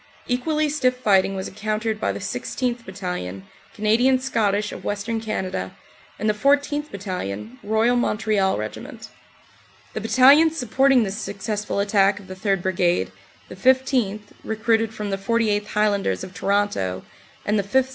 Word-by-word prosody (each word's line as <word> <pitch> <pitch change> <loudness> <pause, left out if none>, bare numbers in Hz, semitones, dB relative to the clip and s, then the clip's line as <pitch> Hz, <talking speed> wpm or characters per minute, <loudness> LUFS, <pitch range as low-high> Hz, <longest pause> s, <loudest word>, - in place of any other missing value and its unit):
Equally 300 +5 0
stiff 260 -4 +1
fighting 195 -5 +3
was 190 0 -4
encountered 215 +1 -3
by - - +1
the - - -5
16th. 245 -2 -3
Battalion, 180 - -5 0.3
Canadian 230 +5 +3
Scottish 210 -5 0
of - - -8
Western 220 +2 -2
Canada, 185 - -3 0.4
and 215 - -2
the 215 - +3
14th. 285 +5 +1
Battalion, 130 - -5
Royal 220 +4 +2
Montreal 215 -5 +1
Regiment. 110 0 -7 0.8
The 215 - -4
battalions 280 +8 +5
supporting 265 0 +3
this 200 +1 -4
successful 205 0 -3
attack 200 -1 +3
of 200 - -13
the 185 - -8
3rd. 195 -1 -1
Brigade, 180 -1 +1 0.4
the - - -10
15th., 255 -5 +2 0.2
recruited 220 0 +1
from 210 -2 -5
the 195 - -2
48th. 210 0 +1
High 210 +1 +2
landers 195 - -1
of 185 - -8
Toronto, 195 - 0 0.4
and 210 0 +1
the - - 0
5th. 260 +7 +1
210 Hz, 145 wpm, -23 LUFS, 195-245 Hz, 0.8 s, battalions